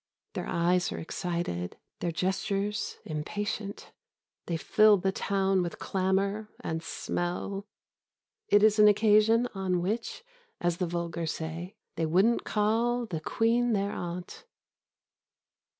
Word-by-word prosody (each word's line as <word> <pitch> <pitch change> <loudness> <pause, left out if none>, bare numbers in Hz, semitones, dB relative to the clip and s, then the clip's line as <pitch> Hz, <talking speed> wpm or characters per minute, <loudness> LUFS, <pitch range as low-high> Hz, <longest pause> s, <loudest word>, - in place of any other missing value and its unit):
Their - - -4
eyes 175 +1 +2
are - - -4
excited, 165 - -3 0.2
their 170 - -1
gestures 195 +4 -1
impatient. 200 +6 -4 0.6
They 170 - -1
fill 215 +5 +5
the 190 +1 0
town 195 -1 +1
with 175 -1 -3
clamour 195 +3 0
and 160 0 -3
smell. 180 +5 -3 0.8
It 205 0 +5
is 215 0 +5
an 210 - +8
occasion 215 +3 +5
on 190 -2 0
which, 220 - -3 0.4
as 175 -1 0
the 180 - -1
vulgar 170 -1 -3
say, 165 +4 -5 0.2
they 160 -1 +1
wouldn't 195 +9 +3
call 230 +3 +1
the 165 -8 -4
Queen 235 +5 +2
their 200 -1 0
aunt.... 175 - -6
195 Hz, 120 wpm, -29 LUFS, 175-210 Hz, 0.8 s, an